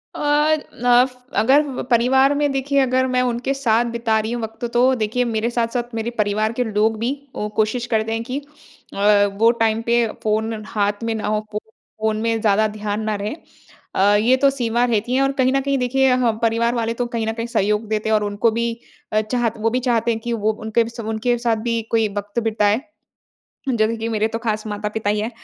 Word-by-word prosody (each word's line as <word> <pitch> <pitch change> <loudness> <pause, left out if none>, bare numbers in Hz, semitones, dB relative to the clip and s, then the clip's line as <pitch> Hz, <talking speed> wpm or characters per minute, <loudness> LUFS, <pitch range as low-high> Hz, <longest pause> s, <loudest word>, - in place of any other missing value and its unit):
अ, - - -6 0.6
enough 245 +1 +4 0.2
अगर 270 +4 +2
परिवार 265 +4 +4
में 290 0 +1
देखिए 275 +1 0
अगर 260 -1 +2
मैं 255 0 +1
उनके 245 +2 -1
साथ 240 -4 +2
बिता 230 -2 +1
रही 220 +2 -3
हूँ 240 - -3
वक़्त 225 +2 -5
तो 255 +2 +4
देखिए 230 +2 0
मेरे 225 0 -1
साथ-साथ 240 0 -2
मेरे 225 +1 -2
परिवार 215 +1 0
के - - +3
लोग 220 0 +1
भी 240 +3 0 0.4
कोशिश 220 +3 0
करते 220 0 +1
हैं 225 0 -2
कि 255 +3 -4 0.6
अ, 205 0 +4
वो 210 +4 +3
टाइम 225 -1 0
पे 235 0 +2 0.2
फ़ोन 220 0 -1
हाथ 205 0 -1
में 230 0 -1
ना 210 -2 -3
हो, 215 0 +1 0.2
फ़ोन 220 0 -4
में 225 0 0
ज़्यादा 215 0 +3
ध्यान 210 0 -4
ना 215 -1 -1
रहे। 205 +5 -4 0.6
अ, 200 +2 +4
ये 235 +5 +4
तो 275 +1 +4
सीमा 240 -3 0
रहती 235 0 0
है 265 - +3
और 275 0 +2
कहीं 260 0 +3
न 275 - +2
कहीं 275 0 0
देखिए 260 +1 +2 0.3
परिवार 230 +1 +1
वाले 230 -1 -1
तो 245 +1 -2
कहीं 225 -1 -1
न 220 - -1
कहीं 230 +1 -4
सहयोग 210 -1 0
देते 215 0 -1
हैं - - +2
और 210 - +1
उनको 205 +3 +1
भी 235 +1 -1 0.5
चाहत 225 +1 0
वो 225 +1 +1
भी 250 +3 0
चाहते 235 -2 +1
हैं 225 - -2
कि 235 +1 -3
वो 220 -1 +1
उनके 225 +1 +1
सब 230 -2 -8
उनके 230 +2 0
साथ 230 -1 +1
भी 230 -1 0
कोई 225 -1 +3
वक़्त 205 +3 -2
बिताए। 215 +1 +1 0.9
जैसे 230 -2 +1
कि 225 0 -3
मेरे 220 -1 0
तो 225 - -4
खास 220 -2 -2
माता-पिता 210 0 -2
ही 210 0 0
है, 220 +3 -2
230 Hz, 210 wpm, -21 LUFS, 215-245 Hz, 0.9 s, enough